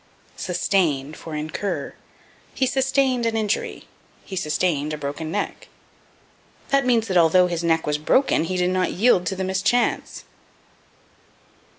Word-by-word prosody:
Sustain 150 -7 0
for 155 0 -8
Incur. 155 +6 -3 0.6
"He 265 - +2
sustained 265 -2 +1
an 225 -1 -1
injury." 215 -1 -2 0.4
"He 190 - -7
sustained 155 -3 0
a - - -3
broken 145 +2 -5
neck." 205 - -4 1.0
That 275 -2 +2
means 230 -3 +2
that 185 -3 +1
although 175 +2 +5
his 170 -1 -2
neck 165 -1 +1
was 150 0 -1
broken 165 - +2
he 185 +2 -2
did 180 0 +1
not 185 0 0
yield 185 -3 +3
to 190 - -1
the 190 - -3
mischance. 190 +6 0
185 Hz, 135 wpm, -23 LUFS, 160-225 Hz, 1.0 s, although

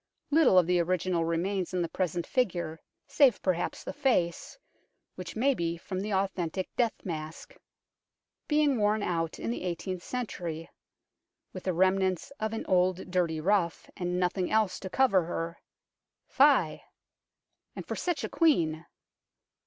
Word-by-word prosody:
Little 290 - +5
of 180 - +6
the 180 +1 +2
original 175 0 0
remains 180 +3 -1
in 180 - +1
the - - -1
present 175 -1 -2
figure, 175 - -1 0.2
save 270 -7 +4
perhaps 180 -2 -1
the - - -5
face, 230 - 0 0.6
which - - -8
may 270 +5 +3
be 170 -6 -2
from 185 +2 -5
the 210 +2 -3
authentic 190 -2 -2
death 235 -3 +1
mask. 160 - -6 0.9
Being 295 -4 +2
worn 210 0 +2
out 165 -3 -1
in - - -3
the - - -4
eighteenth 180 +1 -4
century, 175 -9 -5 0.4
" - - -56
with 185 - -8
the 185 - +1
remnants 185 +2 +1
of 220 0 -1
an 225 - -4
old 185 0 +1
dirty 170 -3 +1
ruff, 175 0 0
and 180 -1 -2
nothing 180 0 0
else 215 -4 +1
to 190 - -6
cover 195 -7 +3
her 165 0 -4 0.3
" - - -61
fie! - - +5 0.9
and - - -7
for - - -4
such 350 -4 -2
a - - -3
Queen 170 - +2
185 Hz, 155 wpm, -29 LUFS, 170-215 Hz, 0.9 s, of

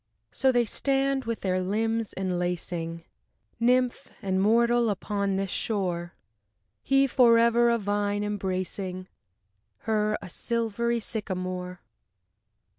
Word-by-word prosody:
So 265 0 +2
they 245 -1 +2
stand 270 +2 0
with 230 -1 -3
their 185 -1 0
limbs 225 +3 -1
enlacing, 175 -2 -3 0.6
Nymph 250 +1 +2
and 190 -1 0
mortal, 235 +2 +3
upon 200 -1 -1
this 195 -1 -2
shore, 175 -5 -2 0.7
He 270 0 +3
forever 235 -2 +5
a 235 - +3
vine 205 0 -1
embracing 185 -2 -3 0.7
Her, 215 -1 +1
a 195 - -9
silvery 235 +3 -1
sycamore. 185 -4 -4
210 Hz, 105 wpm, -27 LUFS, 185-235 Hz, 0.7 s, forever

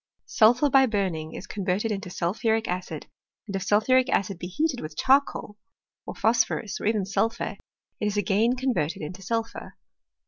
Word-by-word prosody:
Sulphur 245 +5 +4
by 265 -1 +5
burning 185 -8 -2
is - - -7
converted 200 +2 -1
into 195 -2 -4
sulphuric 220 +6 0
acid; 180 +1 -4 0.4
and 200 -3 -5
if 195 - -2
sulphuric 255 +7 +3
acid 195 -2 0
be 175 - -5
heated 280 - -1
with 155 0 -8
charcoal, 265 -6 +2 0.5
or - - -6
phos 230 +2 +3
phorus, 210 - -5
or - - -1
even 215 -3 +1
sulphur, 225 +3 -1 0.4
it 210 - 0
is 210 0 -2
again 205 +5 +2
converted 245 - -1
into 180 +5 -7
sulphur. 225 +4 -4
210 Hz, 165 wpm, -26 LUFS, 185-235 Hz, 0.5 s, by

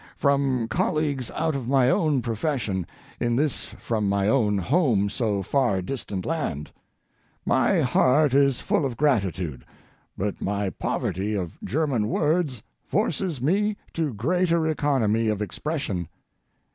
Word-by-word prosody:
From 140 -4 +1
colleagues 140 +1 0
out 160 -1 -1
of 130 -4 -4
my 130 -1 +4
own 145 -2 +2
profession, 115 - -2 0.3
in 120 0 +1
this 145 +2 0
from 110 -3 -2
my 100 0 +1
own 105 -4 +2
home 115 - +2
so 105 -3 -1
far 120 -3 +1
distant 100 -4 -4
land. 90 - -3 0.7
My - - +3
heart 145 +2 +3
is 140 -2 +3
full - - +1
of 130 -4 -2
gratitude, 95 - 0 0.5
but 100 +1 -3
my 100 -1 -1
poverty 100 +4 -2
of 90 -5 -4
German 135 -7 0
words 150 -3 0 0.2
forces 160 -10 -1
me 205 +7 +1 0.2
to 160 -4 -1
greater 170 - +1
economy 130 -8 +1
of 105 -2 0
expression. 105 - -3
125 Hz, 130 wpm, -25 LUFS, 105-150 Hz, 0.7 s, my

